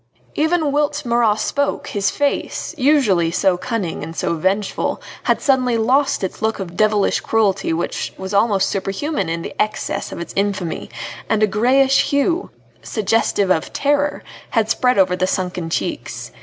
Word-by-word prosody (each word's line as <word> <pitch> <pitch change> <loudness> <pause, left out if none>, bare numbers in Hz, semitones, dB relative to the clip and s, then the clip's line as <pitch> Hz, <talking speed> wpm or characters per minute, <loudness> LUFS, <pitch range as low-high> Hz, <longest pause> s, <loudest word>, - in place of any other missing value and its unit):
Even 315 -1 +1
whilst 295 0 0
Marat 235 -3 +3
spoke 285 +5 -1
his 200 -1 0
face, 290 +3 -2
usually 255 - +3
so 180 +2 +2
cunning 200 -2 -3
and 165 - -7
so - - -1
vengeful, 190 +5 -1 0.3
had - - +2
suddenly 255 -4 +2
lost 260 +2 +2
its 190 - -4
look 220 0 0
of 175 -3 -6
devilish 210 -1 +2
cruelty 200 -5 +1
which 165 +2 -2
was 190 +1 -6
almost 200 -2 +3
superhuman 195 - -2
in 165 0 -3
the - - -6
excess 215 - -2
of - - -6
its 170 - -6
infamy, 195 -4 -2 0.4
and 215 -1 +2
a - - +5
greyish 260 +6 +3
hue 330 +6 +1 0.3
suggestive 205 -2 +1
of 160 -3 0
terror 290 +1 0 0.3
had 225 -2 +1
spread 250 -3 +2
over 185 -2 +4
the 185 0 0
sunken 180 -3 -2
cheeks. - - -3
215 Hz, 155 wpm, -19 LUFS, 190-270 Hz, 0.4 s, a